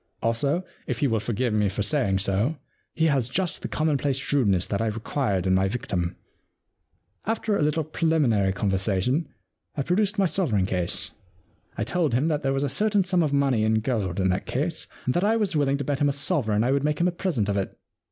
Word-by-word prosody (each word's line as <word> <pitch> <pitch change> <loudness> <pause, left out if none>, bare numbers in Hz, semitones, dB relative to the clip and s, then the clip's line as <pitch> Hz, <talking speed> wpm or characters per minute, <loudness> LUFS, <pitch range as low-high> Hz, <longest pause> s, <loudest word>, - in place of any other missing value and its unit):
Also, 140 +10 +1 0.2
if - - -2
he 145 - +2
will 115 -3 +1
forgive 115 +2 -1
me 105 -2 +2
for 100 +2 -2
saying 110 -6 +1
so, 100 +10 0 0.4
he 160 - +2
has 135 -6 +1
just 180 +3 -1
the - - -3
commonplace 145 -3 0
shrewdness 110 -10 +1
that 100 - -2
I 115 - +1
required 110 -3 -1
in 95 - +3
my 95 +1 +3
victim. 95 -6 -2 0.5
* 90 +4 -42
After 220 -2 -1
a - - 0
little 150 +2 +1
preliminary 145 -11 +2
conversation, 100 - 0 0.5
I 140 - 0
produced 205 +6 +1
my 195 - +3
sovereign 140 - +1
case. 90 0 -1 0.7
I - - 0
told 165 -9 0
him 145 +6 +2
that 150 -2 0
there 135 - 0
was 135 +1 0
a - - +1
certain 205 +7 +2
sum 180 -1 +1
of 155 -3 +1
money 135 -6 +2
in 110 0 +2
gold 105 -7 -1
in 95 0 +2
that 90 +1 -1
case, 155 +5 -2 0.2
and 125 - +1
that 175 - +1
I 215 +2 +3
was 205 -6 0
willing 140 -2 +2
to 140 - -3
bet 140 +1 -2
him 145 - +4
a - - 0
sovereign 130 - +1
I 125 - +2
would 140 0 +1
make 150 0 0
him 175 - +3
a - - +1
present 170 - -1
of 100 - 0
it. 100 -1 -3
135 Hz, 220 wpm, -25 LUFS, 105-155 Hz, 0.7 s, him